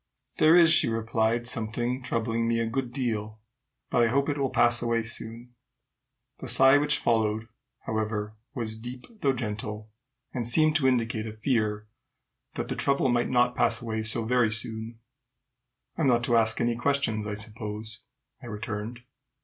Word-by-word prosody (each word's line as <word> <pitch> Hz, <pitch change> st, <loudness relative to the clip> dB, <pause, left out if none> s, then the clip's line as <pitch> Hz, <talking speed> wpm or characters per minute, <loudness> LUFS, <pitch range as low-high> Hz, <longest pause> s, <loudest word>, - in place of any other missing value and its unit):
"There 155 Hz, +2 st, +6 dB
is," 170 Hz, -2 st, +7 dB
she 160 Hz, -, +4 dB
replied, 115 Hz, +1 st, 0 dB
"something 120 Hz, +2 st, -1 dB
troubling 115 Hz, -1 st, -1 dB
me 115 Hz, 0 st, +1 dB
a 115 Hz, -, 0 dB
good 125 Hz, +2 st, -3 dB
deal; 110 Hz, -5 st, -3 dB, 0.5 s
but 120 Hz, -, +3 dB
I 115 Hz, -, +4 dB
hope 140 Hz, +5 st, +1 dB
it 145 Hz, -, -1 dB
will 135 Hz, -1 st, 0 dB
pass 120 Hz, -1 st, +3 dB
away 115 Hz, -1 st, 0 dB
soon." 115 Hz, +2 st, -5 dB, 0.9 s
The 130 Hz, -, -7 dB
sigh 135 Hz, +3 st, +6 dB
which 150 Hz, 0 st, +1 dB
followed, 110 Hz, -1 st, 0 dB, 0.3 s
however, 110 Hz, -1 st, -3 dB, 0.2 s
was 110 Hz, -4 st, -3 dB
deep 125 Hz, +2 st, -8 dB, 0.2 s
though 135 Hz, -1 st, +2 dB
gentle, 105 Hz, -2 st, -5 dB, 0.4 s
and 120 Hz, -3 st, -2 dB
seemed 155 Hz, +5 st, +5 dB
to 135 Hz, -5 st, +1 dB
indicate 115 Hz, -3 st, 0 dB
a 110 Hz, -, -6 dB
fear 110 Hz, -3 st, 0 dB, 0.7 s
that -, -, -3 dB
the -, -, -3 dB
trouble 140 Hz, -1 st, +1 dB
might 120 Hz, 0 st, +1 dB
not 125 Hz, -1 st, +2 dB
pass 115 Hz, -2 st, +3 dB
away 110 Hz, -2 st, -3 dB
so 110 Hz, +1 st, 0 dB
very 120 Hz, -2 st, +2 dB
soon. 110 Hz, +1 st, -3 dB, 1.0 s
"I -, -, +1 dB
am 145 Hz, -, +3 dB
not 120 Hz, -2 st, +3 dB
to 120 Hz, -1 st, +1 dB
ask 110 Hz, -1 st, +3 dB
you -, -, +1 dB
any 120 Hz, 0 st, 0 dB
questions, 120 Hz, -4 st, 0 dB
I 105 Hz, -, -3 dB
suppose," 110 Hz, +1 st, -6 dB, 0.4 s
I -, -, -10 dB
returned. 110 Hz, +1 st, -5 dB
115 Hz, 170 wpm, -27 LUFS, 110-125 Hz, 1.0 s, is